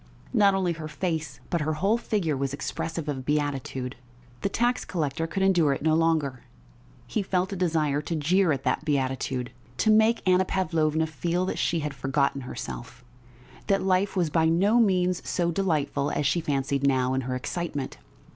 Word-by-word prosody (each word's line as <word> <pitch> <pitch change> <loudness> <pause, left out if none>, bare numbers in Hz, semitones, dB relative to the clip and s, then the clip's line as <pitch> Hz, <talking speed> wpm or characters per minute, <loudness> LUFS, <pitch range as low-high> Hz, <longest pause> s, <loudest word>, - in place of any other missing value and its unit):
Not 200 -4 +5
only 185 -3 +1
her 160 -1 -6
face 160 +1 -3
but 170 - +1
her 155 +1 0
whole 195 +9 +1
figure 190 -10 -1
was 135 0 -2
expressive 165 +2 -4
of 135 -3 -3
beatitude.... 135 -3 -2 0.4
The - - 0
tax 240 +4 +1
collector 165 -2 -2
could 190 +4 -1
endure 175 -7 +4
it 135 - -5
no 160 0 +3
longer; 155 -5 +1 0.6
he 215 - -1
felt 190 0 -1
a - - -3
desire 155 -5 +1
to 165 +3 -3
jeer 170 +4 +3
at 135 -2 -1
that - - 0
beatitude, 130 -3 -1 0.3
to 220 - +3
make 220 0 +3
Anna 185 0 +5
Pavlovna 160 -4 +1
feel 170 +4 -1
that - - -3
she 165 -1 +1
had 150 -1 -3
forgotten 135 +1 0
herself, 125 - -7 0.6
that 195 -2 +2
life 190 +1 +1
was 175 -5 +1
by 160 +1 +3
no 195 +8 +3
means 185 -5 +2
so 170 -1 +1
delightful 155 -6 0
as 145 - -1
she 160 +5 +2
fancied 140 -2 -1
now 130 -1 +2
in 130 - 0
her 130 0 -3
excitement.... 145 +1 -4
160 Hz, 175 wpm, -26 LUFS, 140-185 Hz, 0.6 s, Not